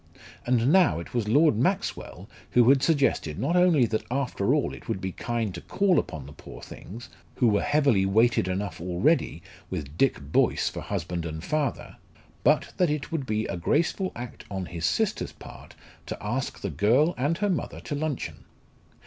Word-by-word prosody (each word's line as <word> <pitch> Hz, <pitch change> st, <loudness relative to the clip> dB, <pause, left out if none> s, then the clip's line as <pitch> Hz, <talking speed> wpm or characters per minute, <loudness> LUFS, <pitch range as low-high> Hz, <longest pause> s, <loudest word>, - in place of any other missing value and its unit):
And 125 Hz, +3 st, +3 dB
now 175 Hz, -, +4 dB
it 85 Hz, -, -9 dB
was 120 Hz, -4 st, -1 dB
Lord 145 Hz, +4 st, +4 dB
Maxwell 160 Hz, -, -2 dB, 0.3 s
who 120 Hz, -1 st, +5 dB
had 135 Hz, -1 st, +5 dB
suggested 135 Hz, -, +1 dB
not 170 Hz, -, 0 dB
only 175 Hz, -8 st, +5 dB
that 110 Hz, -1 st, -2 dB
after 125 Hz, -6 st, 0 dB
all -, -, 0 dB
it -, -, -11 dB
would -, -, -1 dB
be 95 Hz, 0 st, -3 dB
kind 115 Hz, -1 st, -3 dB
to 85 Hz, -, -7 dB
call 195 Hz, -5 st, +2 dB
upon 75 Hz, -4 st, -5 dB
the 70 Hz, -, -11 dB
poor -, -, -11 dB
things, 120 Hz, +6 st, -10 dB, 0.3 s
who 125 Hz, -, +3 dB
were 105 Hz, -1 st, +2 dB
heavily 145 Hz, -9 st, +3 dB
weighted 110 Hz, 0 st, +3 dB
enough 95 Hz, -1 st, -3 dB
already 90 Hz, -, +1 dB, 0.3 s
with 75 Hz, -5 st, -5 dB
Dick 135 Hz, -, +3 dB
Boyce 70 Hz, +1 st, +1 dB
for -, -, -7 dB
husband 85 Hz, +1 st, -3 dB
and 80 Hz, 0 st, -5 dB
father, 145 Hz, +2 st, -2 dB, 0.5 s
but -, -, +2 dB
that 180 Hz, -3 st, +3 dB
it 150 Hz, -1 st, -3 dB
would 150 Hz, -5 st, -2 dB
be 110 Hz, 0 st, 0 dB
a -, -, -4 dB
graceful 170 Hz, -, 0 dB
act 120 Hz, 0 st, -8 dB
on 95 Hz, -2 st, -4 dB
his 85 Hz, -2 st, -2 dB
sister's -, -, -1 dB
part -, -, -13 dB, 0.3 s
to -, -, -4 dB
ask 120 Hz, +8 st, -3 dB
the 100 Hz, -, -3 dB
girl 115 Hz, -, +3 dB
and 145 Hz, +6 st, 0 dB
her 205 Hz, -1 st, 0 dB
mother 175 Hz, -, -3 dB
to -, -, -5 dB
luncheon. 145 Hz, -2 st, -4 dB
120 Hz, 185 wpm, -26 LUFS, 95-145 Hz, 0.5 s, who